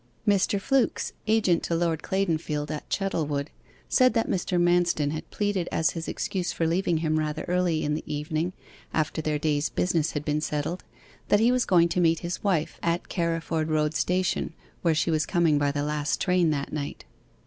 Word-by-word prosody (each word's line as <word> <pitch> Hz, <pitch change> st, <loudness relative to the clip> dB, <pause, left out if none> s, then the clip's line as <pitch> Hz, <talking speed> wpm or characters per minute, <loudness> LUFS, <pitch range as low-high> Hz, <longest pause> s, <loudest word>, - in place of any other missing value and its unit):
Mr. 200 Hz, 0 st, +3 dB
Flooks, 270 Hz, +5 st, +1 dB
agent 210 Hz, -6 st, +3 dB
to 170 Hz, -, -1 dB
Lord 165 Hz, -2 st, 0 dB
Claydonfield 160 Hz, -6 st, -1 dB
at 150 Hz, -, -6 dB
Chettlewood, 150 Hz, -7 st, -1 dB, 0.4 s
said 255 Hz, 0 st, +4 dB
that 225 Hz, -, +2 dB
Mr. 180 Hz, -1 st, 0 dB
Manston 175 Hz, -4 st, +2 dB
had 155 Hz, -, -6 dB
pleaded 205 Hz, -4 st, -1 dB
as 160 Hz, -, +2 dB
his 165 Hz, -1 st, -5 dB
excuse 180 Hz, -2 st, -2 dB
for 165 Hz, -, -1 dB
leaving 170 Hz, 0 st, +1 dB
him 155 Hz, 0 st, +2 dB
rather 150 Hz, -1 st, -2 dB
early 180 Hz, -3 st, +1 dB
in 150 Hz, -, 0 dB
the 155 Hz, -, -3 dB
evening 155 Hz, +4 st, -2 dB, 0.4 s
after 155 Hz, 0 st, 0 dB
their 155 Hz, -1 st, 0 dB
day's 150 Hz, 0 st, 0 dB
business 165 Hz, -3 st, 0 dB
had 150 Hz, -1 st, -3 dB
been 150 Hz, 0 st, 0 dB
settled, 155 Hz, +4 st, -2 dB, 0.4 s
that 205 Hz, -, +4 dB
he 230 Hz, +3 st, +4 dB
was 250 Hz, -1 st, +2 dB
going 170 Hz, -3 st, +5 dB
to 180 Hz, -, +1 dB
meet 165 Hz, -1 st, +3 dB
his 175 Hz, +1 st, -4 dB
wife 175 Hz, -7 st, 0 dB
at 170 Hz, +1 st, -1 dB
Carriford 165 Hz, -2 st, -1 dB
Road 155 Hz, 0 st, +1 dB
Station, 180 Hz, 0 st, 0 dB, 0.3 s
where 165 Hz, -2 st, +2 dB
she 165 Hz, -, +1 dB
was 155 Hz, -1 st, +1 dB
coming 165 Hz, -5 st, +3 dB
by 145 Hz, -1 st, +2 dB
the 145 Hz, 0 st, -2 dB
last 150 Hz, 0 st, -1 dB
train 180 Hz, -3 st, +2 dB
that 145 Hz, -2 st, -2 dB
night. 145 Hz, -2 st, -5 dB
165 Hz, 185 wpm, -26 LUFS, 150-180 Hz, 0.4 s, going